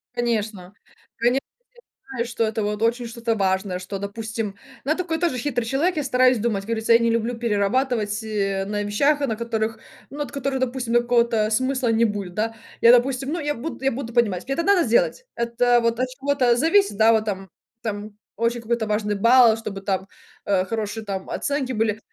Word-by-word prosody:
Конечно. 215 -5 -2 0.4
Конечно, 245 +3 +2
я - - -74 0.6
знаю, 235 - 0
что 235 -1 -2
это 220 0 -1
вот 210 +1 -2
очень 235 +1 +1
что-то 230 0 -2
важное. 190 -1 0
Что, 195 +2 -5
допустим 215 0 -4 0.3
Ну, 280 - -1
я 315 - +1
такой 335 -3 -2
тоже 335 -7 0
хитрый 245 -2 -1
человек. 305 +9 +1
Я 300 - 0
стараюсь 255 -2 +3
думать, 215 -3 -1
как 200 - -14
говорится, 225 0 +2
я 230 - +7
не 230 0 +2
люблю 230 +1 0
перерабатывать 220 0 0
и, 220 - -7
э, 195 -1 0
на 205 +1 -2
вещах, 280 +9 +2
на 230 -6 0
которых, 225 -1 -2 0.3
ну 285 - -9
вот 290 - -3
которые, 275 -1 -2
допустим, 250 -2 -2
ну 240 - +5
какого-то 235 -3 +2
смысла 260 +2 0
не 225 +1 +3
будет, 200 -4 -3
да. 225 +1 -1 0.3
Я 235 - +8
допустим, 260 +3 +2
ну 345 - -2
я 295 -1 -2
буду, 270 +2 -6
я 270 - +3
буду 235 -1 -5
понимать. 215 -7 +1
Мне 270 - -2
это 335 - -1
надо 395 -2 +4
сделать? 240 - +1
Это 235 +1 +2
вот 230 +1 0
от 255 - +1
чего-то 260 -2 +1
зависит, 330 - +3
да? 225 +1 +6
Вот 220 -1 +2
там 195 -3 -4 0.3
там, 210 -1 -5 0.2
очень 230 +2 -1
какой-то 230 -1 -1
важный 210 0 0
балл, 230 +2 +6
чтобы 195 -3 -6
там, 190 -1 -2 0.4
э, 190 -2 +1
хорошие 220 0 -3
оценки 255 +8 -3
были. 220 -2 0
230 Hz, 200 wpm, -23 LUFS, 210-255 Hz, 0.6 s, Я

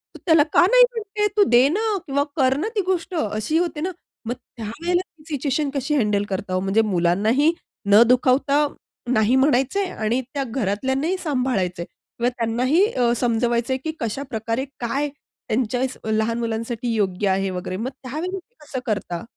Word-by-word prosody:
तू - - -10
त्याला 320 -4 +6
का - - +6
नाही - - +8
म्हणते 420 -2 -1
तू 410 - +7
दे 245 +2 +6
ना 425 +3 0
किंवा 280 +1 +1
कर 265 -3 +3
ना 335 - -1
ती 410 - +2
गोष्ट 370 -1 -1
अशी 215 +2 -1
होते 340 -3 -1
ना." 370 - -1 0.3
मग 235 - -1
त्यावेळेला 315 +14 -3 0.2
ती 300 - -19
सिच्युएशन 285 +1 0
कशी 280 +2 -1
हँडल 210 -5 +2
करता. 190 -1 -3
हो 185 - +2
म्हणजे 195 +4 +2
मुलांनाही 210 - +2 0.4
न 205 +2 +8
दुखावता 270 +4 +3 0.4
नाही 235 +1 +3
म्हणायचे 270 +8 +2
आणि 230 -2 -1
त्या 280 -1 -1
घरातल्यांनाही 265 - -1
सांभाळायचं 250 - -1
आहे - - -4 0.3
किंवा 240 +1 +2
त्यांनाही 250 - +2
अ, 245 - +1
समजवायचं 235 +1 +1
आहे - - 0
की 315 - -2
कशाप्रकारे 230 0 -3
काय 275 +5 -1
त्यांच्या 250 -3 -3 0.3
लहान 220 +2 0
मुलांसाठी 230 +1 -2
योग्य 200 -1 0
आहे 195 0 +1
वगैरे 185 0 -4
मग 230 +6 -3
त्यावेळेला 325 +9 -4
ते 475 +6 -27
कसं 285 -3 -5
करता? 200 -6 -2
255 Hz, 165 wpm, -22 LUFS, 220-300 Hz, 0.4 s, नाही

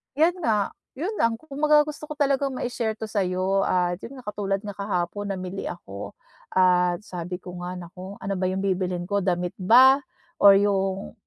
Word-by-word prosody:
'yon 335 +4 +3
nga. 210 -3 +1 0.3
'Yon 345 +9 -2
lang. 230 0 +3
Kumbaga 300 0 +3
gusto 300 0 -6
ko 300 - -5
talagang 275 -1 +1
mai-share 235 -3 -2
to 220 - -5
sa'yo 190 -1 +1
at 175 -1 +1
'yon 275 - -8
nga, 250 - -13
katulad 195 -1 -1
nga 205 -1 -6
kahapon 200 0 -2
namili 185 +1 -5
ako. 100 - -8 0.4
At 180 0 +3
sabi 180 0 -5
ko 180 -1 -8
nga, 180 +1 -5
"Naku, 180 +3 -9
ano 195 - -3
ba 185 - 0
'yong 190 +1 -2
bibilhin 185 -2 -1
ko? 200 - +2
Damit 180 -1 -1
ba? 255 +8 +7 0.4
Or 200 -1 +8
yung" 195 -1 0
195 Hz, 175 wpm, -25 LUFS, 180-230 Hz, 0.4 s, Or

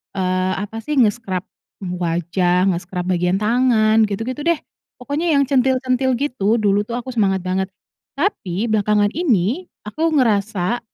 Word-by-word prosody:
eee, 185 0 0
apa 220 +2 -6
sih, 300 +6 -3
nge-scrub, 210 -6 +1 0.4
mmm, 180 -1 -4
wajah, 175 +2 +1
nge-scrub 180 +1 -4
bagian 180 +1 +1
tangan, 220 0 +3
gitu-gitu 225 +7 -4
deh. 340 -2 +2 0.4
Pokoknya 285 +7 -3
yang 280 - +4
centil-centil 260 -1 +1
gitu, 235 -5 0
dulu 205 -2 +1
tuh 235 - -4
aku 250 +1 -5
semangat 195 -6 +1
banget. 185 +1 -1 0.5
Tapi 235 - -1
belakangan 210 -1 +2
ini 280 - 0 0.2
aku 310 +11 -1
ngerasa, 220 - +1
215 Hz, 135 wpm, -20 LUFS, 185-255 Hz, 0.5 s, yang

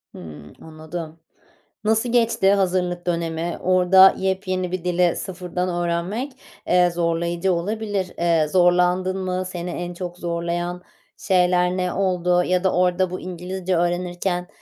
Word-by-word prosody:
Hımm, 75 -4 -11
anladım. 160 +1 -8 0.6
Nasıl 220 +2 +1
geçti 230 -5 +3
hazırlık 180 -2 0
dönemi? 170 0 -2
Orada 185 +1 +6
yepyeni 185 -1 -2
bir 185 -2 -3
dili 180 -1 +2
sıfırdan 180 -1 -4
öğrenmek, 175 +9 -2 0.4
eee, 180 0 +4
zorlayıcı 170 +2 0
olabilir. 200 +1 -2
Eee, 165 -2 +2
zorlandın 180 +2 +2
mı? 185 0 -2
Seni 180 -1 -5
en 175 0 -5
çok 175 0 -6
zorlayan 175 +1 -3 0.3
şeyler 180 -1 +2
ne 180 -1 -1
oldu 180 -2 +1
ya 180 0 0
da 190 - +2
orada 180 +1 +2
bu 185 - -4
İngilizce 180 +1 -3
öğrenirken, 175 +1 -1
180 Hz, 125 wpm, -22 LUFS, 175-185 Hz, 0.6 s, Orada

